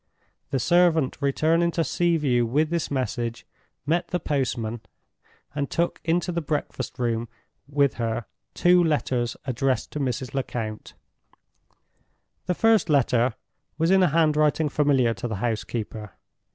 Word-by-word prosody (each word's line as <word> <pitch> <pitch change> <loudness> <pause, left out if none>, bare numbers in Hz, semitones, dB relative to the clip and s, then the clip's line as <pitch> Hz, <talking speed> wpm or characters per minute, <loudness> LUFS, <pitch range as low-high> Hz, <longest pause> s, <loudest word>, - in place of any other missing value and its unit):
The 135 - 0
servant 165 0 +2
returning 160 +5 +2
to 165 - +1
Sea 170 +1 +1
View 125 -6 +2
with 150 +7 +1
this 170 -1 -1
message, 125 -4 -3 0.4
met 170 +3 0
the 180 - -1
postman, 120 -7 -2 0.7
and 140 -1 -2
took 170 +1 -1
into 175 +2 0
the 170 0 -2
breakfast 150 -2 -3
room 120 -2 -1 0.4
with 140 -1 +2
her 115 0 -2 0.3
two 180 0 +5
letters 130 -6 0
addressed 130 0 -1
to 150 - -4
Mrs. 130 -2 -2
Lecount. 115 -5 -4 1.5
The 180 - +1
first 225 -3 +3
letter 125 -4 +2 0.4
was 165 +3 +2
in 190 0 +5
a 180 - +4
handwriting 155 -1 +2
familiar 135 -5 +2
to 120 - -5
the 110 - -3
housekeeper. 110 -1 -4
140 Hz, 135 wpm, -25 LUFS, 120-165 Hz, 1.5 s, two